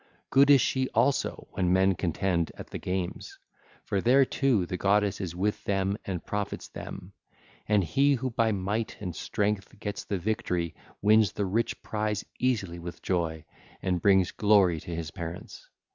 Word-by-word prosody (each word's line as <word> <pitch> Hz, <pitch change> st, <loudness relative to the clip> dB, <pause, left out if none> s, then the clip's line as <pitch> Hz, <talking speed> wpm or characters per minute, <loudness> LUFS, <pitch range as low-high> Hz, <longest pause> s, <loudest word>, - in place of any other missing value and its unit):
Good 140 Hz, +1 st, +6 dB
is 140 Hz, -3 st, +8 dB
she 130 Hz, +1 st, 0 dB
also 140 Hz, +1 st, +1 dB
when 90 Hz, -2 st, 0 dB
men 95 Hz, +1 st, +4 dB
contend 85 Hz, -1 st, 0 dB
at -, -, -10 dB
the -, -, -5 dB
games, 90 Hz, -1 st, -4 dB, 0.5 s
for 100 Hz, -, -1 dB
there 130 Hz, +5 st, +5 dB
too 125 Hz, -9 st, +1 dB
the 90 Hz, -, -4 dB
goddess 100 Hz, +2 st, +1 dB
is 85 Hz, -3 st, -4 dB
with 100 Hz, +3 st, -1 dB
them 95 Hz, 0 st, 0 dB
and 90 Hz, -4 st, -4 dB
profits 105 Hz, -1 st, -3 dB
them: -, -, -8 dB, 0.5 s
and 105 Hz, -2 st, +3 dB
he 140 Hz, -, +3 dB
who 130 Hz, 0 st, -3 dB
by 115 Hz, -1 st, +2 dB
might 105 Hz, +3 st, -2 dB
and 90 Hz, -5 st, -5 dB
strength 105 Hz, 0 st, -2 dB
gets 100 Hz, -1 st, -4 dB
the 100 Hz, -, -2 dB
victory 90 Hz, -4 st, -1 dB, 0.3 s
wins 105 Hz, 0 st, +5 dB
the 100 Hz, -, -1 dB
rich 110 Hz, +5 st, -1 dB
prize 105 Hz, -1 st, -2 dB
easily 100 Hz, -9 st, 0 dB
with 85 Hz, 0 st, -8 dB
joy, 80 Hz, -4 st, -1 dB, 0.4 s
and 90 Hz, -2 st, 0 dB
brings 95 Hz, -2 st, +4 dB
glory 100 Hz, -6 st, +4 dB
to 85 Hz, +2 st, -6 dB
his 80 Hz, -1 st, -5 dB
parents. 85 Hz, -1 st, -8 dB
100 Hz, 165 wpm, -28 LUFS, 90-110 Hz, 0.5 s, is